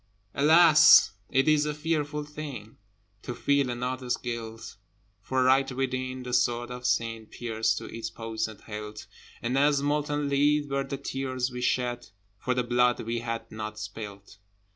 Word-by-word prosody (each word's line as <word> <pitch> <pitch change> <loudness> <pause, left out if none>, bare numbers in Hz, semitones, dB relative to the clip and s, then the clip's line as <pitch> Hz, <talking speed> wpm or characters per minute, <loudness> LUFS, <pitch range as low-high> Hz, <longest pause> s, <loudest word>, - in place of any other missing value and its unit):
Alas! 155 - +7 0.2
it 135 +2 +2
is 150 -1 +4
a 150 - -2
fearful 150 -1 -2
thing 145 -8 -8 0.5
To 120 - -6
feel 140 -1 +1
another's 125 +1 -2
guilt! 115 -2 -6 0.4
For, 130 +5 0
right 135 +1 +3
within, 130 0 -3
the 125 0 -6
sword 120 0 +1
of 125 0 -4
Sin 115 -1 -1
Pierced 110 -1 -1
to - - -5
its 115 0 -6
poisoned 110 -2 -5
hilt, 105 0 -8 0.4
And 120 +2 -1
as 145 -1 +3
molten 145 0 0
lead 145 +1 +2
were 140 0 0
the 135 0 -4
tears 130 -1 -3
we 125 0 -6
shed 120 -1 -1 0.3
For 125 - -1
the 125 - +1
blood 125 0 +2
we 115 +1 -2
had 115 -1 -5
not 110 0 -6
spilt. 105 -1 -8
125 Hz, 155 wpm, -27 LUFS, 115-140 Hz, 0.5 s, Alas